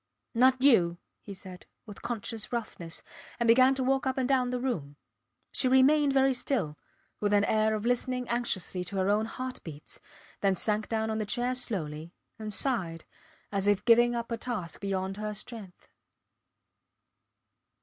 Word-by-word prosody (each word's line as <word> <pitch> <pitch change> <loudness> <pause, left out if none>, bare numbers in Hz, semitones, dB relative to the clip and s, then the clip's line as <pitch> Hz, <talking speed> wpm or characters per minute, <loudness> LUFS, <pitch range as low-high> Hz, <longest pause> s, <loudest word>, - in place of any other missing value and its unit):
Not 255 +2 +4
you, 175 -11 +5 0.2
he 200 - -9
said, 185 -1 -11 0.2
with 205 -3 -11
conscious 230 -1 -4
roughness, 210 -8 -4 0.4
and 235 - +1
began 255 +3 +6
to 265 - -1
walk 270 +1 +1
up 260 - -1
and 260 -2 +1
down 255 -2 +2
the 250 0 -2
room. 170 - -3 0.6
She 260 - +1
remained 275 +3 +5
very 270 0 +4
still 230 - -1 0.4
with 205 0 +1
an 205 - +4
air 215 +1 +2
of 215 +1 -4
listening 250 +1 0
anxiously 210 -6 -1
to 180 - -4
her 190 +1 +2
own 215 +2 +1
heart 255 +2 -6
beats, 150 -3 -9 0.4
then 195 -1 +2
sank 210 +3 -1
down 220 -1 0
on 220 - -2
the 215 - -1
chair 245 +3 0
slowly, 170 -9 -4 0.2
and 215 -1 -5
sighed, 190 - -2 0.5
as 200 -1 0
if 205 -1 +2
giving 240 0 +5
up 235 0 -4
a 230 - -1
task 220 -9 -4
beyond 195 -1 -2
her 210 0 -4
strength. 210 -3 -9
220 Hz, 165 wpm, -29 LUFS, 195-250 Hz, 0.6 s, began